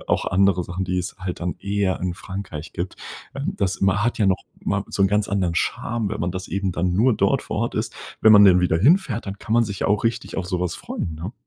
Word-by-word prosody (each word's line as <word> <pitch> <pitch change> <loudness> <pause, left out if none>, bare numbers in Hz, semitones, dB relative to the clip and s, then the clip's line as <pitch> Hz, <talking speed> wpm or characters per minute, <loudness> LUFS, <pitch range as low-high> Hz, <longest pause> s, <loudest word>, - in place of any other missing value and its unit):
auch, - - +1
andere 95 -1 +2
Sachen, 95 +2 -4
die 90 0 -1
es 90 - -4
halt 95 -1 -4
dann 90 0 -2
eher 100 -2 -1
in 90 -1 -2
Frankreich 90 -5 -7
gibt, 90 +1 -4 0.4
ähm, 140 +1 -3
das 95 -2 -1
ma 95 +1 +2
hat 120 +2 0
ja 105 - +3
noch 95 -1 +1 0.2
mal - - 0
so - - 0
'n 95 - +5
ganz 105 0 +1
anderen 95 -4 0
Charme, 115 +3 -1
wenn 110 - -4
man 85 +1 0
das 95 +1 -6
eben 95 -2 -1
dann 90 +1 0
nur 115 +5 +4
dort - - +1
vor - - -4
Ort - - -1
isst. - - -2 0.3
Wenn 110 - +7
man 105 -1 +9
dann 90 -2 +6
wieder 85 -2 +2
hinfährt, 130 - +3
dann 100 +1 -5
kann 110 - -5
man 120 0 +4
sich 100 -3 -4
auch 105 +2 +1
richtig 115 - -1
auf 90 -2 -2
sowas 90 -1 -1
freuen, 80 - -5
ne? 85 +8 -6
95 Hz, 250 wpm, -23 LUFS, 90-105 Hz, 0.4 s, man